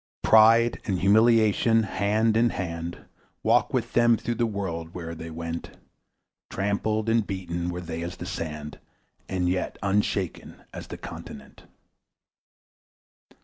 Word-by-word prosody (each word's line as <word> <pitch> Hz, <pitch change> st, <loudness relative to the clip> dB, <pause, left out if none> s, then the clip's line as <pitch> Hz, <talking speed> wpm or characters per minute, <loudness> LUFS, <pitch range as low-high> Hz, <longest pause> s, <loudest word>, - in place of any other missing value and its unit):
Pride 115 Hz, +2 st, +6 dB
and 95 Hz, -3 st, 0 dB
humiliation 110 Hz, +2 st, +4 dB
hand 105 Hz, +2 st, +1 dB
in 120 Hz, +1 st, +4 dB
hand 85 Hz, -3 st, -5 dB, 0.4 s
Walked -, -, +3 dB
with -, -, -2 dB
them 120 Hz, -1 st, +4 dB
through 120 Hz, -, -3 dB
the 120 Hz, 0 st, 0 dB
world 85 Hz, -6 st, -5 dB
where'er 85 Hz, -2 st, -5 dB
they 80 Hz, 0 st, -8 dB
went; 85 Hz, +1 st, -6 dB, 0.7 s
Trampled 105 Hz, +2 st, -1 dB
and 115 Hz, -2 st, +2 dB
beaten 90 Hz, -3 st, -3 dB
were 90 Hz, 0 st, -4 dB
they 85 Hz, -1 st, -5 dB
as 85 Hz, +1 st, -5 dB
the -, -, -7 dB
sand, 75 Hz, -2 st, -6 dB, 0.5 s
And 90 Hz, -2 st, 0 dB
yet 90 Hz, +1 st, -1 dB
unshaken 100 Hz, -2 st, -1 dB
as -, -, -8 dB
the -, -, -7 dB
continent. -, -, -10 dB
95 Hz, 130 wpm, -26 LUFS, 85-110 Hz, 0.7 s, Pride